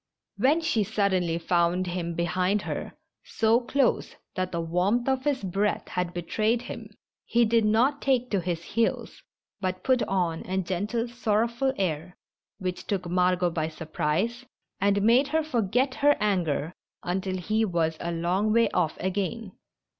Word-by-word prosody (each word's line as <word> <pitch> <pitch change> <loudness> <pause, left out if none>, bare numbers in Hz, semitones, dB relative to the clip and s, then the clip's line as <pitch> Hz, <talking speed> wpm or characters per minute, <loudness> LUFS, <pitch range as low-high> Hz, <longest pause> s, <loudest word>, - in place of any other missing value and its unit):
When 295 +6 +3
she 280 -10 +1
suddenly 190 -5 +1
found 175 +1 +1
him 175 -1 -3
behind 180 +4 0
her, - - -5 0.3
so 225 +1 +2
close 260 +1 0 0.2
that 185 -1 -2
the 170 - -2
warmth 180 +9 +1
of 265 0 0
his 285 -6 0
breath 195 +3 -1
had 180 -1 -2
betrayed 215 +7 0
him, 225 -3 -8 0.3
he 235 0 +3
did 225 0 +3
not 245 +7 +2
take 250 -2 +1
to 200 -3 +1
his 170 -1 -3
heels, 225 +5 -1 0.4
but 185 -1 -3
put 255 -2 +3
on 175 -4 0
a 190 +1 -1
gentle, 200 +6 -1
sorrowful 235 +2 0
air, 180 -1 -2 0.4
which 185 -2 -4
took 190 -3 -2
Margot 180 0 +2
by 160 -2 -1
sur 160 0 -8
prise, 165 +11 -1 0.4
and 200 0 +2
made 240 +6 +5
her 315 +2 +1
forget 250 -1 +1
her 290 +1 +3
anger 175 -6 0 0.3
until 185 +1 -2
he 215 +5 0
was 165 -5 0
a 170 - -3
long 180 +5 0
way 230 -1 +3
off 165 -3 0
again. 190 +2 -2
195 Hz, 155 wpm, -27 LUFS, 175-230 Hz, 0.4 s, made